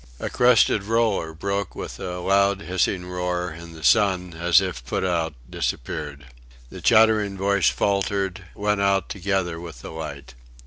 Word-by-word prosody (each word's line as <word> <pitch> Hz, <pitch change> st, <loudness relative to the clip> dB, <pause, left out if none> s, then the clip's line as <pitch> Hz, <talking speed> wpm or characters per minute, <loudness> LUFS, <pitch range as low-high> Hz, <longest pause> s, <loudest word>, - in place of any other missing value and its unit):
A -, -, -4 dB
crested 120 Hz, -4 st, +4 dB
roller 110 Hz, -7 st, +1 dB
broke 100 Hz, +4 st, -3 dB
with -, -, -7 dB
a 90 Hz, -1 st, -4 dB
loud 100 Hz, +2 st, +2 dB
hissing 90 Hz, +1 st, -1 dB
roar, 90 Hz, 0 st, -2 dB
and 85 Hz, +1 st, -10 dB
the 80 Hz, -, -11 dB
sun, 90 Hz, +5 st, +3 dB
as 85 Hz, +2 st, +4 dB
if 90 Hz, -10 st, -4 dB
put -, -, -2 dB
out, 85 Hz, -4 st, -1 dB
disappeared. 70 Hz, +4 st, -4 dB, 0.5 s
The -, -, -9 dB
chattering 110 Hz, -3 st, +4 dB
voice 100 Hz, -2 st, +2 dB
faltered, 100 Hz, -1 st, -1 dB
went 105 Hz, 0 st, 0 dB
out 100 Hz, -1 st, +1 dB
together 95 Hz, -3 st, -2 dB
with 85 Hz, -8 st, -10 dB
the -, -, -7 dB
light. 75 Hz, -5 st, -7 dB
95 Hz, 150 wpm, -23 LUFS, 85-100 Hz, 0.5 s, crested